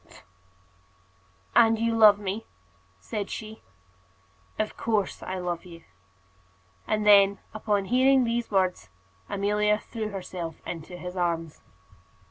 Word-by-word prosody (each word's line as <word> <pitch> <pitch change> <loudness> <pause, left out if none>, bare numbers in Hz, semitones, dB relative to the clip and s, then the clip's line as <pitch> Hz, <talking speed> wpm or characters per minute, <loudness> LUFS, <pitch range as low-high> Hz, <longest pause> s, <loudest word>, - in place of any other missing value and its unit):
said - - -28
she. - - -16
[ILLUSTRATION: 95 0 -23 1.3
"And 225 0 0
you 230 0 +1
love 215 -2 +7
me?" 205 +2 -5 0.5
said 200 - -5
she.] 220 -1 -7 1.0
"Of 215 - -2
course 215 -4 -1
I 185 - -4
love 175 -2 -3
you." 170 -2 -13 1.0
And 215 -1 0
then, 200 -1 +6 0.2
upon 210 -2 -1
hearing 260 +4 +4
these 235 0 -1
words, 185 - 0 0.4
Amelia 210 +1 +1
threw 220 0 -6
herself 180 -4 -6
into 175 +1 -7
his 180 +1 -7
arms. 170 -3 -2
200 Hz, 125 wpm, -26 LUFS, 180-215 Hz, 1.3 s, love